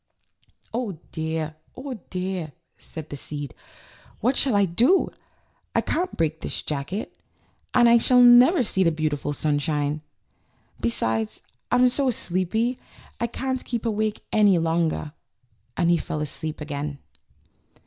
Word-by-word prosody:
"Oh 225 -7 -2
dear, 160 -1 -3 0.2
oh 265 +1 -5 0.2
dear!" 180 -4 -3 0.2
said 160 -1 -9
the - - -4
seed, 145 0 -6 0.7
"what 250 +5 +2
shall 265 -5 +2
I 200 -1 +5
do? 240 - +3 0.7
I - - +4
can't 360 +3 -2
break 160 -1 0
this - - -3
jacket, 150 +8 -4 0.6
and 240 -1 +7
I 235 0 +7
shall 250 +2 +4
never 250 +6 +7
see 190 -4 0
the 165 - +4
beautiful 155 -2 -1
sunshine! 145 0 0 0.8
Be 115 - +2
sides 110 -1 -2 0.3
I'm 250 +1 +5
so 260 +2 +1
sleepy 225 +1 0 0.4
I 235 - 0
can't 260 +2 -3
keep 235 -1 -3
awake 215 -1 -1
any 205 -4 +5
longer;" 165 -2 0 0.6
and 170 -1 +3
he 170 - +4
fell 150 -1 -4
asleep 155 +1 -4
again. 145 -1 -4
175 Hz, 135 wpm, -25 LUFS, 150-235 Hz, 0.8 s, and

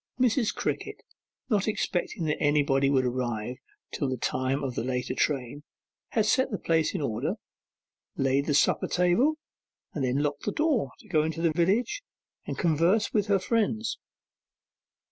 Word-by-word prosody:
Mrs. 245 -2 +2
Crickett, - - -3 0.4
not 210 -5 +1
expecting 180 -5 -1
that 150 -1 -1
anybody 145 -2 +3
would 130 -2 +2
arrive 120 -1 -2 0.4
till 140 - -1
the 130 - -2
time 130 +4 -1
of 130 -2 -2
the 115 - -2
later 125 0 -2
train, 135 0 -1 0.5
had 220 -2 +1
set 260 +4 +2
the 205 - -2
place 165 +1 +1
in 180 - -1
order, 110 -6 -1 0.8
laid 135 +1 +1
the 145 - +2
supper - - +3
table, 180 - +3 0.6
and 145 - -2
then 130 +1 +1
locked 145 -1 -2
the 205 - 0
door, 295 - +1
to - - -19
go 160 -6 +2
into 160 +2 -2
the 165 -2 +3
village 200 - +1 0.5
and - - -4
converse 175 +5 +2
with 210 -2 +1
her 200 -1 +4
friends. 220 +3 0
160 Hz, 160 wpm, -27 LUFS, 135-210 Hz, 0.8 s, her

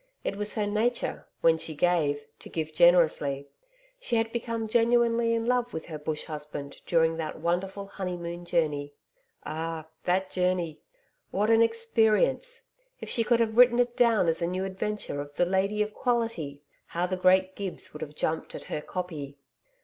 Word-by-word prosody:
It - - -2
was 210 +1 0
her 210 -2 0
nature, 220 +4 -1
when 165 -1 +4
she 160 - -3
gave, 145 -3 +1
to - - -10
give 155 -1 -3
generously. 155 -5 +4 0.5
She 250 - -1
had 225 0 +1
become 230 -1 -3
genuinely 230 0 +3
in 230 0 -1
love 245 0 +1
with 160 - -5
her 155 -3 -7
bush 150 0 -3
husband 150 -2 -6
during 165 -1 +3
that 160 -1 -4
wonderful 190 +4 -1
honeymoon 175 -3 -5
journey. 150 -4 -1 0.5
Ah, 160 0 -4 0.2
that 185 +1 +1
journey! 180 -4 0 0.5
What 210 +3 +1
an 225 0 +6
experience! 230 - +2 0.4
If - - -7
she 230 - +2
could 235 +1 +3
have 225 -1 0
written 245 -1 +7
it 245 0 +1
down 230 -7 +4
as 165 0 +1
a 170 - +1
new 185 +2 -2
adventure 195 -5 -3
of 145 0 -10
'The 175 - +3
Lady 195 +3 +1
of 210 0 -7
Quality,' 225 - -1 0.2
how 175 +1 -1
the 185 +1 -1
great 185 +1 +3
Gibbs 195 -3 -6
would 150 - -9
have 150 -1 -6
jumped 160 +1 -2
at - - -7
her 150 - -4
'copy!' 155 -6 -5
185 Hz, 170 wpm, -28 LUFS, 160-225 Hz, 0.5 s, written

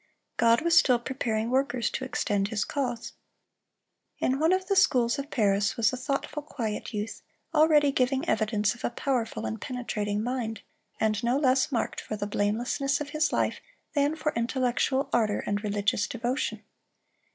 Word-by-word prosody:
God 230 +2 +4
was 335 +1 +2
still 255 -8 +6
preparing 235 -2 -2
workers 255 -3 +1
to - - -3
extend 205 -6 0
His 210 -1 -1
cause. 245 -5 -3 1.0
In 265 +1 0
one 320 +3 +3
of 375 0 +1
the 395 - 0
schools 245 -8 +3
of 280 +1 -5
Paris 205 -2 +1
was 230 +1 +3
a - - 0
thoughtful, 275 +3 -3
quiet 230 -8 -4
youth, 210 0 -4 0.3
already 300 -2 +5
giving 265 +4 +1
evidence 210 -4 +1
of 240 - -14
a - - +1
powerful 240 - -2
and 110 0 -4
penetrating 210 -4 -2
mind, 230 -4 -3 0.4
and 215 0 +1
no 240 +3 +2
less 265 0 +2
marked 235 -4 -1
for 215 - -5
the 205 -1 -3
blamelessness 235 +7 0
of 295 -1 -5
his 305 +1 +1
life - - 0 0.3
than 290 0 +2
for 310 -1 -2
intellectual 255 +3 0
ardor 215 -3 +2
and 205 +1 -1
religious 205 0 0
devotion. 245 +3 -2
245 Hz, 165 wpm, -28 LUFS, 215-275 Hz, 1.0 s, still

